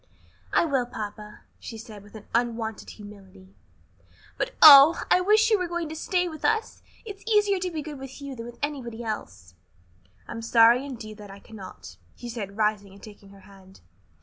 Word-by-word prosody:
"I - - +3
will, 270 -6 -1
papa," 210 -2 -8 0.2
she 225 - -9
said, 215 -2 -11
with 205 +2 -13 0.2
unwonted 230 -2 -2
humility; 195 -2 -14 0.8
"but, - - -2
oh, 295 +2 +9
I 365 - +5
wish 430 +4 +3
you 430 - +4
were 365 - -2
going 345 -2 -4
to 315 - -7
stay 360 +3 -1
with 315 -3 -9
us! 440 0 -1 0.2
It's 405 -2 -10
easier 415 -3 +2
to 365 0 -3
be 315 -3 -5
good 295 -2 -8
with 270 +1 -10
you 280 -2 -8
than 230 -1 -8
with 240 - -12
anybody 240 -6 -5
else." 95 - -7 0.7
"I - - -9
am 230 - -6
sorry, 230 +2 +4
indeed, 220 -5 -9
that 205 -1 -11
I 195 - -11
cannot," 195 - -12 0.2
he 240 - -9
said, 205 -4 -7
rising 210 -2 -1
and 200 - -17
taking 205 -2 -14
her 195 0 -17
hand. 190 -1 -18
230 Hz, 185 wpm, -25 LUFS, 205-310 Hz, 0.8 s, oh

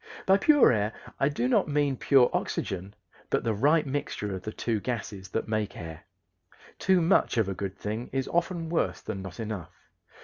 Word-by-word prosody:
By 190 +1 +5
pure 295 +3 +6
air 105 -1 0 0.3
I 140 - +3
do 125 -4 -1
not 130 - +3
mean 145 -2 +1
pure 130 -1 +4
oxygen, 95 +2 -3 0.3
but - - +1
the 115 - +1
right 150 +9 +3
mixture 130 -7 -3
of 95 - -5
the 110 - -5
two 110 0 -1
gases 100 -5 -5
that 110 - -2
make 110 -1 -2
air. 80 -2 -8 0.7
Too 185 -1 +3
much 165 -6 +3
of 110 -4 +3
a 95 - -1
good 100 0 -5
thing 110 +4 -4
is 135 -1 -1
often 170 -1 0
worse 125 - 0
than 95 - -5
not 95 +1 -9
enough. 105 -6 -5
115 Hz, 190 wpm, -28 LUFS, 100-145 Hz, 0.7 s, pure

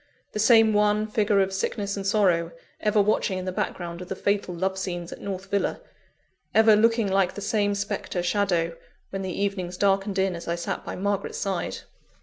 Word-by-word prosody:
the 210 - -4
same 225 0 +6
wan 210 0 +3
figure 210 -1 +2
of 190 0 0
sickness 200 +1 -2
and 195 -1 -4
sorrow, 180 -5 +2 0.3
ever 210 0 +2
watching 200 -2 +2
in 185 - -4
the 185 - -2
background 175 -1 -4
of 180 - -9
the 190 - -3
fatal 200 -1 0
love 190 +2 -1
scenes 175 -2 -4
at - - -12
North 195 0 -6
Villa; 200 -1 0 0.8
ever 220 -1 +7
looking 225 0 +3
like 190 -1 +1
the - - -5
same 205 0 0
spectre 200 -3 -3
shadow, 175 -3 +1 0.4
when 195 - -3
the 190 -1 -3
evenings 185 -3 -2
darkened 195 0 +1
in 190 -1 +1
as 170 - -8
I 170 - 0
sat 170 - -4
by - - -5
Margaret's 200 +1 -2
side? 195 -3 -2
195 Hz, 190 wpm, -25 LUFS, 185-205 Hz, 0.8 s, ever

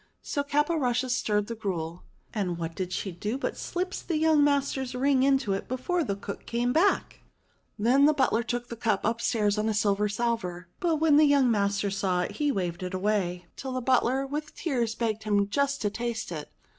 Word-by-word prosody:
So 285 - -1
Caporushes 285 -4 +1
stirred 210 -4 +1
the 230 - -5
gruel, 175 -6 -4 0.3
and 185 -6 -1
what 165 -1 -4
did 185 +1 -4
she 190 +1 -3
do 210 +8 -3
but 275 - -3
slips 365 +1 -3
young 315 -2 +4
master's 275 -3 0
ring 265 +1 +3
into 265 -6 +2
it 195 - -4
before 325 +8 -1
the 200 - -2
cook 200 0 -8
came 240 +1 0
back! 370 +7 +2 0.6
Then 250 +6 +4
the 305 - +5
butler 260 -5 +2
took 240 +1 -3
the 235 - -5
cup 220 -4 0
upstairs 220 -2 +1
on 215 +1 +1
a 215 - 0
silver 205 0 +2
salver. 200 -6 -2
But 335 -2 +1
when 310 -1 +4
the 305 - +7
young 280 -4 +4
master 200 -1 +1
saw 190 -2 0
it - - -2
he 295 -2 +1
waved 175 -6 -2
it 185 +1 -4
away, 185 -3 -1
till 265 -1 -5
the 255 - -1
butler 260 +1 +2
with 295 +2 -5
tears 240 -8 -1
begged 220 -2 -1
him 205 -2 +1
just 280 +3 0
to 205 - +1
taste 235 -3 -3
it. 155 -3 -6
235 Hz, 195 wpm, -27 LUFS, 200-275 Hz, 0.6 s, the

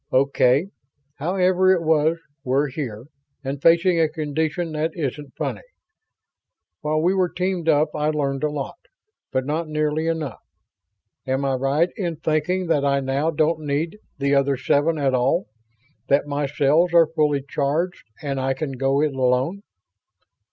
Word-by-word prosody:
"Okay. 140 +4 +3 0.5
However 185 +3 +2
it 180 -3 +2
was, 160 +1 +2 0.3
we're 135 +2 +1
here, 125 -6 -5 0.4
and 135 +1 -4
facing 170 +2 +4
a 160 -1 +3
condition 155 +2 -2
that 155 +1 -1
isn't 145 -3 -4
funny. - - -3 1.2
While 155 +1 0
we 180 +3 +3
were 185 -2 +1
teamed 180 -1 -1
up 150 0 +4
I 150 0 0
learned 140 -2 -1
a 150 - +2
lot, 145 -2 -5 0.5
but 130 0 0
not 155 +3 -2
nearly 155 +1 -1
enough. 160 -6 -2 0.9
Am 135 +1 0
I 135 - +1
right 135 +6 +1
in 175 -5 -2
thinking 155 +5 0
that 155 -4 +1
I 140 0 +2
now 135 +3 0
don't 160 0 +1
need 155 +6 -2 0.2
the 140 0 +1
other 140 -1 +2
seven 145 +4 +1
at 140 -3 +1
all 130 +8 +2 0.6
that 140 +1 +3
my 145 0 -2
cells 150 +5 +2
are 165 -1 +8
fully 150 -3 +2
charged 155 +7 -1 0.2
and 140 -2 -2
I 135 0 0
can 145 0 -3
go 135 +2 +1
it 150 -2 0
alone?" 130 +8 +1
150 Hz, 155 wpm, -23 LUFS, 140-165 Hz, 1.2 s, are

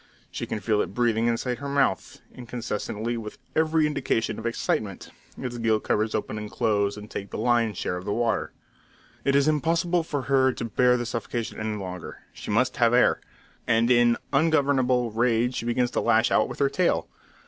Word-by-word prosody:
She - - -5
can 110 - -3
feel 105 +1 +1
it 100 - -5
breathing 115 -1 +2
inside 120 +1 -1
her 140 0 -5
mouth; 140 -1 0
incessantly, 115 -1 -4
with 105 -2 -7 0.2
every 160 0 +3
indication 130 -7 -1
of 115 - -3
excitement, 105 -4 -2 0.3
its 120 -2 -5
gill 110 -1 +2
covers 110 +1 0
open 110 0 -3
and 105 0 -6
close, 105 -3 0
and 105 0 -9
take 100 -1 -6
the - - -6
lion's 115 -4 +1
share 90 - -2
of 90 - -8
the - - -2
water. 115 +1 0 0.7
It 140 - +2
is 140 +1 +4
impossible 170 +3 +1
for 145 -4 -3
her 130 0 +3
to 115 - -5
bear 125 +2 +3
this 120 -1 -3
suffocation 115 -1 -4
any 110 -1 -2
longer; 90 -3 -7
she - - -9
must 115 +5 +1
have 120 0 +4
air; 125 - +4 0.5
and 115 +1 +3
in 120 -1 +4 0.2
ungovernable 135 -6 +2
rage 120 +2 +1
she - - -3
begins 120 +1 +1
to - - 0
lash 115 0 +3
out - - +3
with - - -7
her 140 -1 +2
tail. 180 -2 +1
120 Hz, 190 wpm, -25 LUFS, 110-130 Hz, 0.7 s, is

